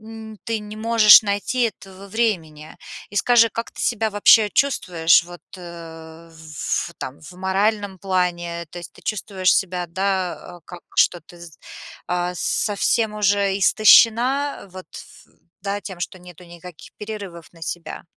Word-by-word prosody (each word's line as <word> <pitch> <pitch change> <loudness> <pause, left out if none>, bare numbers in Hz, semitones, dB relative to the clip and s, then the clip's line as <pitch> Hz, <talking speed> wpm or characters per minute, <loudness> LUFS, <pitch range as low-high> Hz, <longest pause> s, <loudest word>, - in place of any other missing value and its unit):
м, 220 0 -11
ты 225 -1 -2
не 210 0 -10
можешь 220 -1 +7
найти 205 +5 -2
этого 195 -3 -5
времени. 170 -9 -3 0.3
И 205 - -9
скажи, 230 +1 +4
как 230 +2 -6
ты - - -11
себя 225 -2 0
вообще 205 +1 +5
чувствуешь 175 -14 +2
вот, 175 0 -12 0.2
э, 165 -2 -11
в - - -20
ф 160 -2 -4
в - - -18
там, 130 +2 -7
в 155 - -12
моральном 195 +1 -1
плане? 175 -3 -2
То 175 - -9
есть 175 - -10
ты - - -19
чувствуешь 195 -3 0
себя, 180 -2 -1
да, 185 0 -3
а, - - -17
как 175 -1 -11 0.2
что 175 - +3
ты 170 +2 -17
с 165 -3 -13 0.5
а, 180 0 -2
совсем 210 +3 0
уже 200 -1 +1
истощена 235 +7 +4
вот 185 -1 -10
в, - - -14 0.3
да, 200 0 -3
тем, 190 -4 -9
что 185 +1 -5
нету 180 -1 -15
никаких 175 -1 -13
перерывов 200 -7 -8
на 165 -1 -19
себя? 170 +1 -6
190 Hz, 160 wpm, -21 LUFS, 175-215 Hz, 0.5 s, можешь